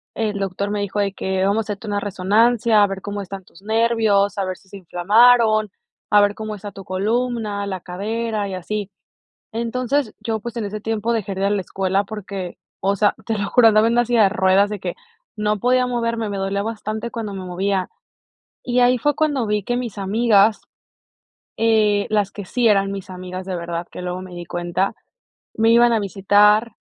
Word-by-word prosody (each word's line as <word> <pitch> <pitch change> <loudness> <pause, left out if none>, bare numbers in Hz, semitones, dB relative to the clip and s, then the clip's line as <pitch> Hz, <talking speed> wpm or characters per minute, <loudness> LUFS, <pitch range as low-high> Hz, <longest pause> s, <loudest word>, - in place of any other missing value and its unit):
el 210 -2 -2
doctor 195 +1 -2
me 205 -1 -1
dijo 200 +1 -3
de 200 -1 0
que 190 -1 -2
vamos 200 +2 +2
a - - 0
hacerte 200 +2 -11
una 205 0 -1
resonancia, 210 +3 +2
a - - +4
ver 195 0 -5
cómo 205 +1 -5
están 195 0 -8
tus 175 - -19
nervios, 220 -2 +2
a 195 - 0
ver 185 -1 -4
si 190 - -25
se 200 - -9
inflamaron, 215 +5 +4 0.4
a 210 -1 +6
ver 205 0 +3
cómo 215 -1 -5
está 205 0 -8
tu 195 - -10
columna, 210 +1 -1
la 190 -2 -4
cadera 215 +3 -3
y 190 - -4
así. 205 +2 -4 0.6
Entonces, 240 +3 -1
yo, 225 -1 -2
pues, 235 +2 -7
en 220 - -2
ese 210 +1 -5
tiempo 225 +1 -1
dejé 205 -4 -2
de 190 - -4
ir 195 - +2
a - - +1
la 205 -1 0
escuela 190 +2 -1
porque, 200 -3 -7 0.2
o 200 +1 +1
sea, 205 +1 +2
te 225 -2 -1
lo 200 - -2
juro, 235 -2 +6
andaba 215 +1 +4
así 240 0 0
de 210 -4 +5
ruedas 195 0 +3
de 210 -1 -5
que - - -4 0.4
no 210 -1 0
podía 250 +2 +2
moverme, 230 -2 -1
me 200 - -3
dolía 195 +1 -1
bastante 220 +1 -4
cuando 220 -4 -5
me 190 -1 -6
movía. 190 +1 -1 0.8
Y 250 0 +1
ahí 250 +1 +5
fue 295 +5 +1
cuando 290 -6 0
vi 210 -1 -1
que 245 - -1
mis 240 -5 -4
amigas, 210 +1 +3 1.0
eh, 215 -2 +2
las 205 -2 +1
que 205 - -7
sí 240 +5 +1
eran 195 -2 +3
mis 195 -1 -7
amigas 185 0 -7
de 185 -1 -3
verdad, 170 0 -4
que - - -8
luego 180 0 -4
me 185 -1 -10
di 175 - -6
cuenta, 175 +3 -2 0.6
me 225 +1 +3
iban 235 +1 +5
a 230 - +3
visitar 205 +3 +3
205 Hz, 205 wpm, -21 LUFS, 195-225 Hz, 1.0 s, a